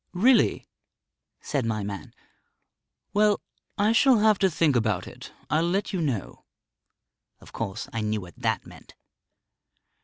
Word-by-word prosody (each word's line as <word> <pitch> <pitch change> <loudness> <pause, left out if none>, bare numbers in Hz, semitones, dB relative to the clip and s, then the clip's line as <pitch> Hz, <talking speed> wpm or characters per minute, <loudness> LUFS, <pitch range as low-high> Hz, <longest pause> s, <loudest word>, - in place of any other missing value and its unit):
"Really?" 235 +8 +3 0.7
said 140 -5 -2
my 110 -2 -2
man. 100 -5 -7 1.0
"Well, 210 0 +3 0.4
I 210 +2 +3
shall 250 +2 +5
have 215 -1 +4
to 190 - +3
think 155 -4 +2
about 110 -6 0
it. - - -11 0.2
I'll 165 +3 +1
let 195 +3 -1
you 185 - -1
know." 130 -10 -3 1.0
Of - - -16
course, 100 -4 -4
I 115 - -2
knew 105 0 -1
what 90 -2 -11
that - - -1
meant. - - -15
155 Hz, 140 wpm, -26 LUFS, -, 1.0 s, shall